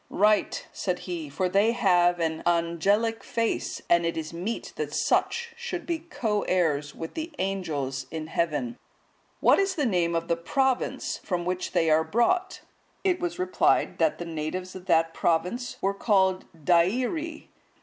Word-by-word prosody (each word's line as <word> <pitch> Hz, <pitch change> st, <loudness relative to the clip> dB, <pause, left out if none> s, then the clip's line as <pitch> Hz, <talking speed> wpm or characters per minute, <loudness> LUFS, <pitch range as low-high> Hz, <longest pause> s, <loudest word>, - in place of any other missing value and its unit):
"Right," 210 Hz, 0 st, +2 dB
said 180 Hz, -2 st, -1 dB
he, 170 Hz, -5 st, -4 dB
"for 180 Hz, +7 st, -1 dB
they 200 Hz, +5 st, +3 dB
have 175 Hz, -5 st, +3 dB
an 160 Hz, -1 st, -1 dB
angelic 175 Hz, +7 st, +1 dB
face, 230 Hz, -1 st, -2 dB
and 170 Hz, 0 st, +4 dB
it 170 Hz, 0 st, -1 dB
is 160 Hz, 0 st, -4 dB
meet 190 Hz, +7 st, -4 dB
that -, -, -3 dB
such 470 Hz, 0 st, +1 dB
should 470 Hz, -7 st, -5 dB
be 335 Hz, -2 st, -1 dB
co 225 Hz, -10 st, -2 dB
heirs 150 Hz, -6 st, +1 dB
with 165 Hz, -, -6 dB
the 325 Hz, +1 st, -4 dB
Angels 145 Hz, -9 st, -2 dB
in 160 Hz, -1 st, -5 dB
heaven. 170 Hz, +10 st, -2 dB, 0.6 s
What -, -, +5 dB
is 390 Hz, -1 st, +1 dB
the 295 Hz, -5 st, 0 dB
name 175 Hz, -6 st, +1 dB
of 165 Hz, 0 st, -1 dB
the 170 Hz, -, +2 dB
province 260 Hz, +10 st, -1 dB
from 175 Hz, -2 st, -3 dB
which 180 Hz, 0 st, -2 dB
they 165 Hz, -1 st, +3 dB
are 155 Hz, +1 st, +4 dB
brought?" 360 Hz, -, +1 dB, 0.4 s
It 370 Hz, -2 st, +2 dB
was 350 Hz, -1 st, -3 dB
replied, 365 Hz, 0 st, +2 dB
that 310 Hz, -, +2 dB
the 175 Hz, -, -5 dB
natives 165 Hz, +3 st, -4 dB
of 185 Hz, 0 st, -10 dB
that 165 Hz, -2 st, +3 dB
province 180 Hz, +10 st, 0 dB
were 195 Hz, +1 st, +1 dB
called 190 Hz, -2 st, +2 dB
Deiri. 240 Hz, -, +1 dB
185 Hz, 160 wpm, -27 LUFS, 170-240 Hz, 0.6 s, What